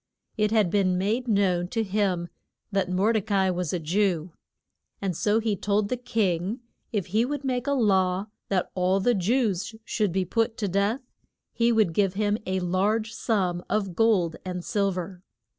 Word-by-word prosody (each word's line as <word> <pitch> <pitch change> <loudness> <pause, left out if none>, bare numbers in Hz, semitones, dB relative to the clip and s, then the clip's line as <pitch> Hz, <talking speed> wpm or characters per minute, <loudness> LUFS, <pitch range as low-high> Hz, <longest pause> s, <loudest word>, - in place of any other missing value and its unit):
It 210 -1 +2
had 210 -5 +2
been 185 -3 +2
made 220 +7 0
known 190 -5 +2
to 225 +4 -1
him 190 -4 0 0.4
that 195 -2 0
Mor 195 +5 +2
de 220 - +2
ca 205 +1 -2
i 190 -1 +3
was 180 -3 -2
a 180 - 0
Jew. 175 0 0 0.7
And 190 -3 -2
so 210 +6 +2
he 220 -2 0
told 205 +1 0
the 250 - 0
king 210 -3 -1 0.3
if 205 -6 -1
he 215 +5 +1
would 285 +2 -3
make 255 -1 -1
a 280 - +2
law 190 -6 +2 0.2
that 190 -2 0
all 185 +1 +2
the 240 +5 +3
Jews 210 0 0
should 210 -4 0
be 190 +1 0
put 225 +4 0
to 205 - -1
death, 200 +7 0 0.5
he 235 0 +2
would 215 -7 +3
give 195 0 +1
him 210 +1 +1
a 190 0 0
large 210 +5 0
sum 180 -6 0
of 195 -4 -1
gold 190 -6 +2
and 180 -1 -5
sil 200 -3 +1
ver. 180 0 -5
200 Hz, 185 wpm, -26 LUFS, 185-220 Hz, 0.7 s, i